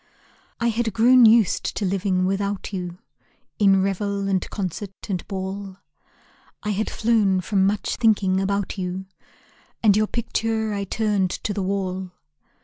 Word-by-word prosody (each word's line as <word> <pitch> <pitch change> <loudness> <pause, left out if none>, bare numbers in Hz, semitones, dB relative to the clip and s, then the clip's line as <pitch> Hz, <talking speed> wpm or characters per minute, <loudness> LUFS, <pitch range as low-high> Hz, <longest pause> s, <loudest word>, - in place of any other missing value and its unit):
I 235 0 +2
had 230 -1 -1
grown 240 +2 +6
used 220 -3 +3
to 205 - -1
living 185 -1 0
without 200 +1 -2
you. 180 -2 -4 0.6
In 195 -2 +5
revel 200 0 -1
and 190 -2 -1
concert 195 0 -4 0.2
and 185 -4 -3
ball, 190 0 -5 0.9
I 210 - -1
had 210 +2 -1
flown 215 -5 +2
from 190 +1 +2
much 205 +1 -1
thinking 200 -5 +2
about 200 0 -2
you, 185 +1 -4 0.8
And 205 -3 +6
your 215 0 +2
picture 225 -1 -1
I 200 -1 -2
turned 205 -2 0
to 205 - -3
the 200 - -2
wall. 190 -1 -2
200 Hz, 140 wpm, -23 LUFS, 190-215 Hz, 0.9 s, grown